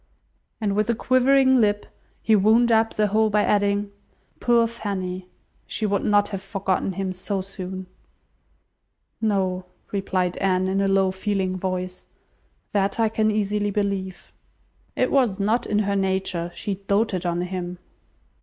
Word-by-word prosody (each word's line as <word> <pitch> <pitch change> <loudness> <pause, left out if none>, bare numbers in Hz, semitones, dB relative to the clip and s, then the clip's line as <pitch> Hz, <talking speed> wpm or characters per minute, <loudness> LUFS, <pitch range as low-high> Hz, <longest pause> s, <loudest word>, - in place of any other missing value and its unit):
And 205 -3 0
with 215 +2 +1
a 235 - +2
quivering 260 +2 +4
lip 205 -1 +1 0.4
he 220 - +4
wound 220 +4 +4
up 225 0 +3
the 215 - +2
whole 215 +2 +2
by 210 0 +2
adding, 205 0 +1 0.5
"Poor 235 -1 +4
Fanny! 190 -5 -4 0.4
she 220 - -2
would 200 -1 +1
not 205 -1 +3
have 195 -2 -4
forgotten 195 -1 -1
him 190 0 -3
so 190 +2 -3
soon!" 190 -1 -7 1.4
"No," 190 -4 0 0.2
replied 185 -3 -1
Anne, 185 -1 +1
in 195 +1 +1
a 195 - +2
low, 195 -1 +3
feeling 190 -1 -1
voice. 185 0 -4 0.6
"That 200 +1 0
I 225 -1 +3
can 215 0 +1
easily 210 -1 0
believe." 195 -2 -3 0.6
"It - - +1
was 240 -8 +2
not 220 +4 +1
in 210 - 0
her 200 -1 +1
nature. 190 -3 -1
She 200 -2 -3
doted 200 -3 +1
on 175 -1 -1
him." 180 0 -4
200 Hz, 145 wpm, -24 LUFS, 190-215 Hz, 1.4 s, quivering